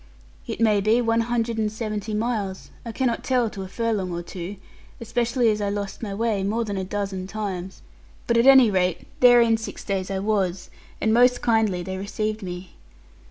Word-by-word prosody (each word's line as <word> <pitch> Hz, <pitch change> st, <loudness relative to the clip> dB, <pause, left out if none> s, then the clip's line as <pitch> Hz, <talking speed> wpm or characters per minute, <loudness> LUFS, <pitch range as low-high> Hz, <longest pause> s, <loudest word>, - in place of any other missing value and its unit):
It -, -, -5 dB
may 215 Hz, -3 st, +3 dB
be 215 Hz, +4 st, +3 dB
one 230 Hz, -1 st, +2 dB
hundred 230 Hz, -1 st, -1 dB
and 215 Hz, -1 st, 0 dB
seventy 215 Hz, -1 st, -4 dB
miles, 210 Hz, -4 st, -3 dB
I 230 Hz, -, -6 dB
cannot 240 Hz, -1 st, -1 dB
tell 245 Hz, -4 st, +1 dB
to 200 Hz, -4 st, -7 dB
a 190 Hz, -, -5 dB
furlong 210 Hz, -3 st, -2 dB
or 175 Hz, 0 st, -4 dB
two, 180 Hz, +2 st, -7 dB, 0.4 s
especially 235 Hz, +1 st, +1 dB
as 210 Hz, 0 st, -2 dB
I 200 Hz, -, 0 dB
lost 200 Hz, -1 st, -4 dB
my 215 Hz, -3 st, -4 dB
way 215 Hz, 0 st, 0 dB
more 220 Hz, +4 st, -1 dB
than 205 Hz, -2 st, -4 dB
a 190 Hz, -, -2 dB
dozen 195 Hz, -1 st, -4 dB
times; 190 Hz, -3 st, -5 dB, 0.4 s
but 235 Hz, -, +1 dB
at 235 Hz, +3 st, +4 dB
any 265 Hz, -5 st, +8 dB
rate 180 Hz, -2 st, 0 dB
there 245 Hz, -1 st, +7 dB
in 230 Hz, -1 st, +3 dB
six 225 Hz, -, -7 dB
days 190 Hz, -2 st, -2 dB
I 195 Hz, -, -2 dB
was, 195 Hz, -3 st, -1 dB, 0.3 s
and 220 Hz, -, +1 dB
most 245 Hz, +1 st, +4 dB
kindly 220 Hz, -6 st, +2 dB
they 190 Hz, +1 st, -5 dB
received 215 Hz, +2 st, -3 dB
me. 180 Hz, -1 st, -7 dB
215 Hz, 195 wpm, -24 LUFS, 195-230 Hz, 0.4 s, any